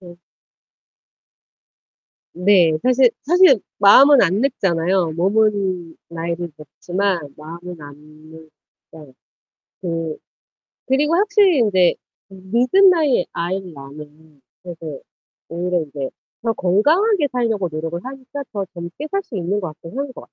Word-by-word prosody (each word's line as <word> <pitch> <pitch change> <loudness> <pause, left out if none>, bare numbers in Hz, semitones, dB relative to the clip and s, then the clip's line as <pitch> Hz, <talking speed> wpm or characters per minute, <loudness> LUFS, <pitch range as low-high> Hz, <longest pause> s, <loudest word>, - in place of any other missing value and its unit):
네. 175 -2 -13 2.2
네 180 -2 +3
사실 255 0 +4
사실 350 - +5 0.2
마음은 265 +8 +7
안 190 +3 +1
늙잖아요. 185 - 0
몸은 190 -2 0
나이를 170 0 -4
먹지만 175 +1 -3
마음은 170 +3 -10
안 145 -1 -11 1.0
늙어요. 150 -4 -14 0.7
그 165 -3 -4 0.7
그리고 290 +5 +1
확실히 405 -5 +3
인제 190 -6 +3 0.4
음 190 -1 -13
늦은 370 +12 +5
나이에 300 - +2
아이를 180 +1 -4
낳으면은 150 +1 -13 0.2
되게 165 -5 -8 0.5
오히려 175 +1 -1
이제 140 -2 -6 0.3
더 230 -1 0
건강하게 300 - +2
살려고 225 -7 -1
노력을 160 +2 -4
하니까 270 +2 -8
더 200 -3 -3
젊게 175 - -7
살 395 - 0
수 230 - -7
있는 190 +3 -1
것 185 - -4
같긴 165 +7 -11
한 280 +1 -2
것 260 - -12
같 - - -9
185 Hz, 250 characters per minute, -19 LUFS, 165-255 Hz, 2.2 s, 마음은